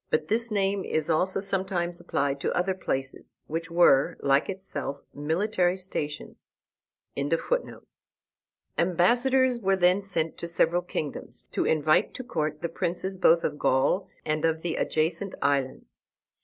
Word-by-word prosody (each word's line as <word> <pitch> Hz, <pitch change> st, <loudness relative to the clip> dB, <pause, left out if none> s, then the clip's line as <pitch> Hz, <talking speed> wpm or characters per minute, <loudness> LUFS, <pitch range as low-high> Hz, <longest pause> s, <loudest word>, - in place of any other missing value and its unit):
But 155 Hz, 0 st, 0 dB
this 230 Hz, +2 st, +2 dB
name 200 Hz, -2 st, 0 dB
is 155 Hz, +1 st, -1 dB
also 185 Hz, +4 st, +1 dB
sometimes 190 Hz, -3 st, -1 dB
applied 140 Hz, 0 st, -1 dB
to -, -, 0 dB
other 185 Hz, +2 st, +1 dB
places, 135 Hz, -7 st, -4 dB
which 165 Hz, +2 st, -4 dB
were, 170 Hz, -5 st, +4 dB
like 140 Hz, +1 st, +2 dB
itself, 190 Hz, -7 st, -4 dB
military 180 Hz, +5 st, 0 dB
stations.] 150 Hz, -6 st, -5 dB, 2.3 s
Ambassadors 240 Hz, +9 st, +3 dB
were 195 Hz, -3 st, +2 dB
then 180 Hz, +1 st, +3 dB
sent 180 Hz, -5 st, -1 dB
into 170 Hz, -, -7 dB
several 170 Hz, +1 st, +2 dB
kingdoms, 155 Hz, -4 st, -6 dB
to -, -, 0 dB
invite 155 Hz, 0 st, +2 dB
to 255 Hz, -, -5 dB
court 155 Hz, -8 st, -3 dB
the 170 Hz, -, -1 dB
princes 185 Hz, +3 st, -3 dB
both 170 Hz, -2 st, +5 dB
of 145 Hz, -, -2 dB
Gaul 180 Hz, +9 st, +2 dB, 0.2 s
and 155 Hz, 0 st, -1 dB
of 160 Hz, -1 st, +1 dB
the 175 Hz, -, -1 dB
adjacent 165 Hz, +5 st, -1 dB
islands. 140 Hz, -2 st, -2 dB
175 Hz, 135 wpm, -27 LUFS, 155-190 Hz, 2.3 s, both